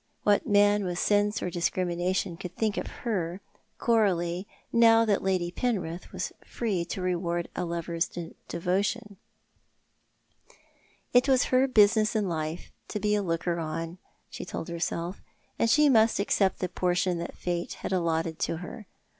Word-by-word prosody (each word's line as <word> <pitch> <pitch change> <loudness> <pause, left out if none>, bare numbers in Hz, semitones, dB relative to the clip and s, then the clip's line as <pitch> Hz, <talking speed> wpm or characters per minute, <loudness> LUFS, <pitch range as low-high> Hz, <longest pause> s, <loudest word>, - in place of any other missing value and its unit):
What 205 -1 +3
man 205 0 +4
with 180 -2 -2
sense 205 +2 +2
or 180 - -2
discrimination 175 +1 -1
could 180 0 -8
think 215 -2 0
of - - -3 0.2
her, 185 -6 -1 0.4
Coralie, 185 -5 +1 0.3
now 230 -1 +6
that 205 -3 +2
Lady 185 -2 0
Penrith 180 -6 -2
was - - -3
free 205 -7 -2
to 185 +1 -4
reward 175 -1 -1
a - - -1
lover's 170 0 -2 0.4
devotion? 200 +4 -1 2.0
It 250 +2 +5
was 260 -2 +5
her 255 +1 +5
business 215 -2 +4
in 210 -2 +1
life 160 0 -4 0.2
to 210 - -3
bo 210 - 0
a 210 0 +3
looker 170 -1 -1
on, 165 +2 -4 0.3
she - - -7
told 175 - -6
herself, 170 +2 -3 0.4
and 230 - +3
she 300 +5 +5
must 225 -5 +4
accept 200 -1 +1
the 185 - +1
portion 180 -1 0
that 170 - -6
Fate 175 -1 -2
had - - -6
allotted 165 -2 0
to 165 - -1
her. 180 +4 -9
185 Hz, 150 wpm, -28 LUFS, 170-210 Hz, 2.0 s, now